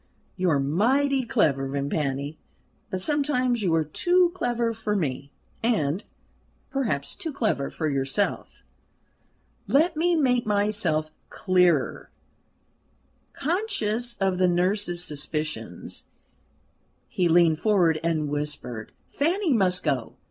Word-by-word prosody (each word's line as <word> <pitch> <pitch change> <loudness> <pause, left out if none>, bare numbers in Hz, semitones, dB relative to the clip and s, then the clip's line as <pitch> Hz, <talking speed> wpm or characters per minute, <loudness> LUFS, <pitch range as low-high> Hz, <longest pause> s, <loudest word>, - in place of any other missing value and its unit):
"You 185 -1 +1
are 145 -3 +3
mighty 255 - +2
clever, 145 - +1
Vimpany; 140 +1 -2 0.5
but 185 - -3
sometimes 255 -3 +1
you 175 -5 +2
are 160 - +2
too 350 - +2
clever 240 -8 -1
for 215 -1 -2
me, 140 -6 -2 0.3
and, 195 -7 0 0.7
perhaps, 220 - -1
too 320 - -5
clever 215 - -1
for 155 - -3
yourself." 140 +7 -1 1.0
"Let 320 +4 +3
me 340 +3 +2
make 250 -7 +2
myself 200 -7 +1 0.2
clearer" 180 -6 +1 1.2
conscious 245 - -1
of 190 -2 0
the 185 - +4
nurse's 175 0 +1
suspicions, 150 - -4 1.0
he 180 -2 0
leaned 165 -2 +4
forward 175 -7 +3
and 160 -3 0
whispered: 145 -6 -4
"Fanny 340 +2 0
must 185 -5 +2
go. 140 -5 -1
185 Hz, 110 wpm, -25 LUFS, 150-245 Hz, 1.2 s, the